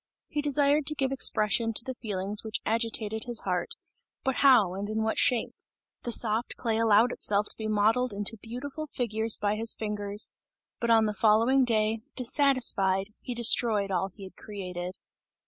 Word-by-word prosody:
He 295 - -2
desired 290 0 +2
to 305 - +5
give 270 -2 -1
expression 225 -3 +2
to 225 - +2
the 260 - -5
feelings 205 -3 -4
which 220 0 -3
agitated 220 -1 -1
his 240 -2 -2
heart; 180 -2 -3 0.5
but 265 -1 -1
how 240 -10 +5
and 200 +2 -5
in 220 0 -1
what 220 - -1
shape? 250 -3 +1 0.5
The 240 - -2
soft 225 +1 +1
clay 225 -2 -2
allowed 225 +2 +4
itself 205 -3 +1
to - - -2
be 220 - -5
modeled 220 +4 +1
into 205 +2 0
beautiful 270 +8 -7
figures 225 -4 0
by 205 +1 -1
his 225 +1 +2
fingers, 210 -1 -4 0.5
but 235 - -2
on 225 -1 +5
the 210 - -1
following 225 +6 +3
day, 220 -2 +1 0.2
dissatisfied, 230 -7 +2
he 245 - -6
destroyed 220 -3 +2
all 190 +1 0
he 195 +2 -14
had 185 -1 -11
created. 180 -3 -7
220 Hz, 170 wpm, -27 LUFS, 205-245 Hz, 0.5 s, to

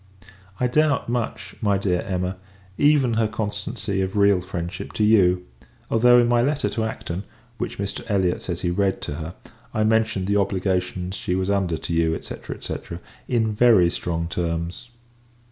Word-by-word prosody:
I 125 - +2
doubt 145 +1 +2
much, 115 -2 -3
my 100 -2 +2
dear 90 -3 0
Emma, 90 0 -2 0.4
even 145 -3 +4
her 110 -1 +2
constancy 105 -2 -3
of 95 +2 -2
real 100 -2 +4
friendship 85 -1 -5
to 110 - 0
you; 90 -4 +4 0.5
although, 120 +2 +6
in 120 -1 +5
my 120 0 +3
letter 145 +3 +1
to 110 - -1
Acton, 95 -4 -4 0.4
which - - -3
Mr. 100 0 -3
Elliot 95 -4 +1
says 85 -2 -4
he 85 - 0
read 95 +1 +1
to - - -3
her, 80 +3 -6 0.4
I 110 - +2
mentioned 110 -3 +2
the 100 +1 +2
obligations 95 -2 -1
she 90 - -2
was 95 +1 0
under 95 -5 +1
to 85 - -5
you, 80 -1 +1
&c. - - -7 0.3
&c. - - -3 0.5
in 115 -3 +1
very 105 -6 +5
strong 85 -2 -2
terms. 85 +5 -3
100 Hz, 165 wpm, -23 LUFS, 90-110 Hz, 0.5 s, although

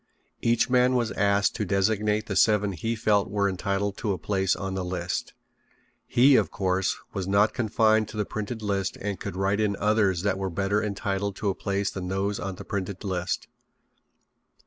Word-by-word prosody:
Each 115 0 +2
man 125 0 +3
was 120 -2 +1
asked 100 0 +2
to 110 - -1
designate 105 +2 +1
the 95 - -4
seven 105 -1 +3
he 115 +6 -2
felt 105 -3 +2
were 100 0 +1
entitled 100 +1 -2
to 105 -3 -1
a - - -3
place 95 +3 0
on 95 -1 -4
the 95 -1 -2
list. 90 0 -3 0.7
He, 135 +3 +5
of - - +2
course, 95 0 0 0.2
was 95 -3 -3
not 100 +2 +3
confined 110 -2 +2
to 110 - -9
the 105 - 0
printed 110 +2 -5
list 100 -2 -1
and 100 -1 -3
could 100 -3 -5
write 100 +2 0
in 105 -2 +1
others 100 -4 +1
that 100 -2 0
were 95 -1 -2
better 100 +4 0
entitled 100 -1 -2
to 105 - -1
a - - +1
place 100 +1 -2
than 90 -2 -5
those 100 +2 -1
on 95 -1 -4
the - - -10
printed 100 -2 -4
list. 95 -2 -2
100 Hz, 190 wpm, -26 LUFS, 95-105 Hz, 0.7 s, He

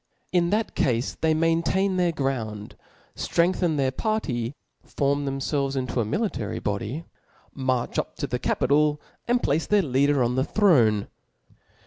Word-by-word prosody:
in 175 -1 +2
that 215 +3 0
cafe 120 -4 +1 0.2
they 160 - +3
maintain 165 +4 +1
their 180 -2 +2
ground, 115 -8 -3 0.4
ftrengthen 170 -2 +1
their 135 -2 +1
party, 135 - -2 0.3
form 140 0 -1
thcmfclves 135 0 -1
into 130 -1 -2
a 115 - +1
military 120 - -2
body, 105 +10 -3 0.5
march 130 -3 -1
up - - -4
to - - -3
the - - -3
capital, 150 +2 +2 0.3
and 245 +1 +2
place 155 +3 +1
their 210 -1 +3
leader 140 -1 +2
on 120 +1 0
the 130 +1 +1
throne. 125 - +3
140 Hz, 140 wpm, -25 LUFS, 130-170 Hz, 0.5 s, they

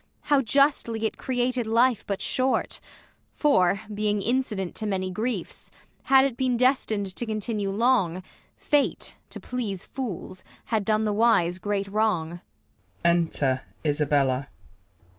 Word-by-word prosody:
How 290 -2 +3
justly 245 -3 +2
it 220 - -3
created 250 -2 -1
life 235 +1 +3
but 200 -1 -2
short; 260 +1 0 0.5
For, 195 - +3
being 210 0 0
incident 220 -6 -1
to 215 - -3
many 185 -2 -1
griefs, 230 +6 -4 0.4
Had 270 0 +6
it 270 -4 -2
been 255 -1 0
destin'd 220 -7 +1
to - - -3
continue 215 -2 -2
long. 195 -5 +1 0.3
Fate, 290 -1 0
to - - -8
please 215 -7 -4
fools, 190 -7 -6 0.2
had 220 -3 -1
done 215 +1 +1
the 210 - 0
wise 205 -6 +3
great 200 0 -2
wrong. 190 -5 -1
220 Hz, 120 wpm, -26 LUFS, 195-250 Hz, 0.5 s, Had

